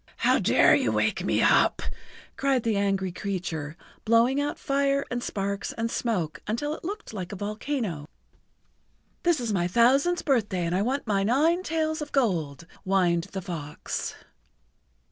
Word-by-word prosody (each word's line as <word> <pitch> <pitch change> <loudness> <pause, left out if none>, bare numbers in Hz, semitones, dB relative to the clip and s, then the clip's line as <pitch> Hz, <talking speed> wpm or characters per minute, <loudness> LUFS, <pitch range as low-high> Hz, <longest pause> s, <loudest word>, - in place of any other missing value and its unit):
"How - - +3
dare - - +5
you - - +2
wake - - 0
me - - +1
up?" - - +4 0.5
cried 270 -3 +1
the 225 -2 +1
angry 195 -2 0
creature, 170 -5 -4 0.3
blowing 235 +5 +3
out 290 +1 -2
fire 275 0 +1
and 245 -1 -2
sparks 200 -2 -3
and 230 0 -2
smoke 185 -10 -2
until 265 +8 -1
it - - -9
looked 410 - -6
like 185 -2 -5
a - - -5
volcano. 210 - -3 1.1
"This 345 -4 +2
is 235 -4 -2
my 175 -2 +1
thousandth 270 - +3
birthday, 210 - +1
and 170 - -1
I 185 - +1
want 260 +6 -1
my 200 -3 +1
nine 295 - +2
tails 315 -2 -1
of 295 - -6
gold," 170 - 0 0.2
whined 180 -3 +2
the 195 -1 -6
fox. 150 -5 -5
220 Hz, 155 wpm, -26 LUFS, 185-275 Hz, 1.1 s, dare